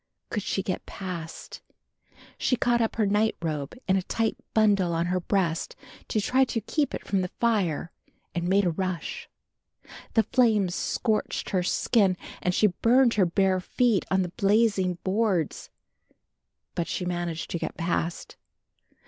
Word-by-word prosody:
Could 210 - -1
she 195 0 -2
get 185 - -4
past? 175 -4 -7 0.7
She 255 - +1
caught 240 0 +2
up 225 - 0
her 220 - +2
nightrobe 170 - 0
in 190 0 +3
a - - +1
tight 225 +4 -1 0.2
bundle 200 -5 +3
on 165 +1 +1
her 180 +1 0
breast 175 -3 -1 0.3
to 215 - 0
try 255 +6 +3
to 235 -3 -1
keep 285 +7 -1
it - - -7
from 195 -1 +1
the 180 - -1
fire 180 -8 0 0.4
and 175 0 -2
made 195 +2 +3
a 175 - +2
rush. 185 0 -4 0.9
The 225 - +5
flames 220 -8 +2
scorched 215 +3 -1
her 185 - +2
skin 190 +1 +2 0.2
and 180 - +1
she - - +4
burned 235 +6 +4
her 190 -4 +3
bare 190 +2 +2
feet 225 +2 +1
on 190 0 +2
the 180 - -4
blazing 200 -3 +2
boards. 190 -4 0 1.0
But 170 - -2
she 180 - -3
managed 175 -2 -3
to 170 - -2
get - - -4
past. 170 0 -2
190 Hz, 155 wpm, -27 LUFS, 175-220 Hz, 1.0 s, The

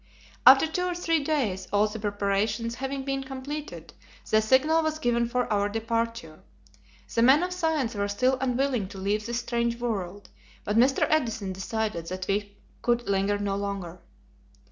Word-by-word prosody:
After 270 +3 +9
two 360 +3 -2
or 360 -1 -2
three 330 -3 0
days 220 -12 -1
all 205 +1 +3
the 215 +1 -7
preparations 205 +2 -1
having 270 +2 -4
been 270 0 -2
completed, 265 - -7 0.4
the 215 - +5
signal 265 +8 +3
was 315 -1 -1
given 235 -4 +1
for 250 0 0
our 205 0 +1
departure. 225 -6 -3 0.7
The 230 - +2
men 265 +7 +6
of 360 0 -2
science 320 -9 0
were 200 -1 -1
still 255 +6 +1
unwilling 255 -4 0
to 195 - -11
leave 205 +3 -1
this 235 +1 -2
strange 235 0 -1
world, 205 -5 -4 0.3
but 210 - -2
Mr. 255 +4 +4
Edison 225 -10 0
decided 195 -3 -3
that 185 +1 -4
we 200 0 -2 0.2
could 240 0 0
linger 200 +1 +1
no 200 -1 -2
longer. 195 -3 -4
230 Hz, 165 wpm, -27 LUFS, 200-265 Hz, 0.7 s, After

